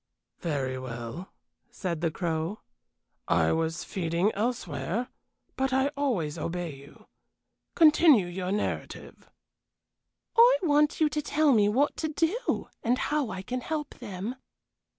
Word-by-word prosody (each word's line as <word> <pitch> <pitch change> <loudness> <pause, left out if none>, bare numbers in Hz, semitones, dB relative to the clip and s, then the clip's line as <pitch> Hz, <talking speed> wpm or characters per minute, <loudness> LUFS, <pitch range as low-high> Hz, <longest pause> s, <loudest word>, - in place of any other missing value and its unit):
"Very 135 -6 -2
well," 120 +7 -7 0.4
said 180 -9 -4
the 170 - +2
Crow. 165 +3 -3 0.7
"I - - +3
was 165 0 -1
feeding 175 +2 0
elsewhere, 220 - -2 0.5
but 265 0 0
I 265 +1 +3
always 225 - -1
obey 170 -2 -3
you. 140 +1 -16 0.7
Continue 305 - +6
your 180 +1 -4
narrative." 210 - -4 1.1
"I 485 +2 +7
want 300 -1 +3
you 310 - +5
to 300 - -2
tell 300 0 +2
me 210 -4 +4
what 270 +7 +2
to 315 - -1
do, 330 +10 -1
and 245 +2 +1
how 295 -4 0
I 190 -2 -5
can 250 +5 -3
help 300 +1 -4
them." 215 +1 -5
210 Hz, 130 wpm, -28 LUFS, -, 1.1 s, I